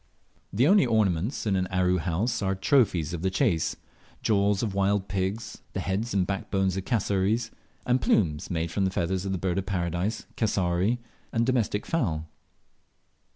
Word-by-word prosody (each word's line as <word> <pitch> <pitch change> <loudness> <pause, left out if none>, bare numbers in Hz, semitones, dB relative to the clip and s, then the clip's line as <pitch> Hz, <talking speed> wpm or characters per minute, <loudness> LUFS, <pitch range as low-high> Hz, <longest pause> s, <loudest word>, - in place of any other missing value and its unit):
The 120 +8 +3
only 200 +1 +6
ornaments 110 - +1
in 100 -3 +1
an 95 -1 0
Aru 90 0 +1
horse 95 +9 -1
are 95 -1 0
trophies 95 - +2
of 85 - -4
the 95 - +1
chase 95 - +1 0.5
jaws 100 -1 +2
of 105 -4 -1
wild 100 0 +1
pigs, 95 +3 -3
the - - -2
heads 100 +5 -2
and 95 -2 +2
backbones 95 -1 -1
of 95 -1 -4
cassowaries, 110 0 0 0.3
and 125 0 +2
plumes 80 -5 +1
made 85 -2 -2
from 100 - 0
the - - +2
feathers 95 +1 -1
of - - -1
the 95 - 0
Bird 90 +1 -1
of 95 - -5
Paradise, 90 +2 -2
cassowary, 95 +1 +1 0.3
and 115 0 +1
domestic 115 -5 0
fowl. 80 - -1
95 Hz, 165 wpm, -27 LUFS, 90-110 Hz, 0.5 s, only